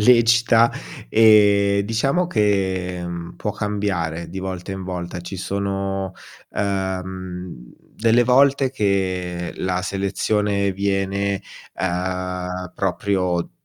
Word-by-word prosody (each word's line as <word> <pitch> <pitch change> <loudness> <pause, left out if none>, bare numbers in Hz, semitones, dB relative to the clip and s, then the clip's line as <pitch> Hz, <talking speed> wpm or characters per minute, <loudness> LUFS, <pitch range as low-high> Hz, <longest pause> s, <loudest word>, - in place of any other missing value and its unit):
lecita, 115 0 +5 0.4
ehm, 100 - +5
diciamo 135 - +1
che 95 - 0 0.3
può - - -2
cambiare 95 -6 -2
di 95 - -6
volta 95 0 -5
in 95 - -5
volta. 90 -1 -5
Ci 90 +3 -7
sono, 95 0 -2 0.4
ehm, 95 -7 -4 0.2
delle 115 +2 +3
volte 135 +2 +4
che 95 -6 -1
la 90 0 -1
selezione 100 +1 0
viene, 100 0 -1 0.3
uhm, 90 0 -3
proprio 90 -2 0
95 Hz, 90 wpm, -22 LUFS, 90-105 Hz, 0.4 s, lecita